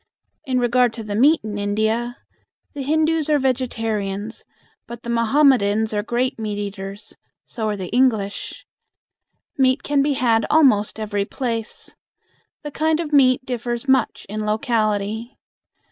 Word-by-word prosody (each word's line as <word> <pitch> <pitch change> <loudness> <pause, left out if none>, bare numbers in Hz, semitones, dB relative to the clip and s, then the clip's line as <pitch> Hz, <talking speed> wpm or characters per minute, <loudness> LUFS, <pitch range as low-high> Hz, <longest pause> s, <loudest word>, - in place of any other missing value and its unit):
In 255 -1 0
regard 245 -1 +2
to 225 - -7
the 210 -1 -5
meat 285 +9 +4
in 210 -1 -5
India: 220 +4 -1 0.6
The 285 - -5
Hindus 315 +2 +1
are 300 - +4
vegetarians, 225 -5 -2 0.4
but 235 0 -9
the 235 - -4
Mohammedans 230 -3 +3
are 205 - 0
great 240 +3 -1
meat 210 -2 -3
eaters. 200 0 -7 0.3
So 220 -3 -3
are 210 - -2
the 185 -2 -6
English. 225 -5 0 0.9
Meat 260 +1 +3
can 285 -1 +1
be 285 +1 +1
had 230 -4 +2
almost 230 -10 +3
every 205 -2 -2
place. 230 -2 -4 0.7
The 295 - -6
kind 315 +2 +1
of 310 -3 -4
meat 260 -2 +4
differs 240 0 -4
much 265 -3 +1
in 215 +1 -4
locality. 215 0 -1
235 Hz, 140 wpm, -21 LUFS, 210-265 Hz, 0.9 s, meat